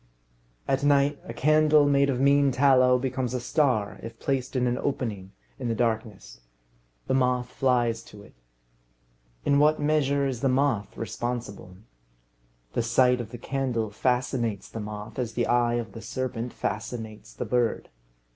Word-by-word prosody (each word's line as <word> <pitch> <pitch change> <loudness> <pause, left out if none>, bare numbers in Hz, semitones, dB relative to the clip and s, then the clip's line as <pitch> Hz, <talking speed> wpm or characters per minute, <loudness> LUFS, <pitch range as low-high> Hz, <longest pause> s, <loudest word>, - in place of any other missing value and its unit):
At 135 +1 0
night, 145 0 +3
a - - -6
candle 155 0 +4
made 140 -1 +3
of 125 -2 0
mean 140 0 +4
tallow 130 -1 +4
becomes 130 -1 -2
a - - -1
star 120 -4 0
if 115 0 -9
placed 135 -1 -2
in 125 -1 +1
an 125 0 0
opening 105 -9 -3 0.3
in 125 - -3
the 115 - 0
darkness. 110 - -3 0.6
The - - -1
moth 125 -1 +1
flies 120 -3 +1
to 105 -1 -13
it. - - -17 1.1
In 140 0 +3
what 155 +1 +4
measure 145 -2 +1
is 130 -4 -3
the 135 - +2
moth 130 -5 0
responsible? 115 -5 -5 1.0
The - - +1
sight 125 +2 +3
of 110 - -8
the 120 - -8
candle 120 -4 -2
fascinates 125 -2 -1
the 115 - -7
moth 105 +2 -7
as 120 -3 -3
the 120 0 0
eye 120 -1 +2
of 115 -3 -3
the 115 - -9
serpent 120 +1 -4
fascinates 110 0 -5
the - - -4
bird. 120 -2 0
125 Hz, 155 wpm, -26 LUFS, 115-135 Hz, 1.1 s, candle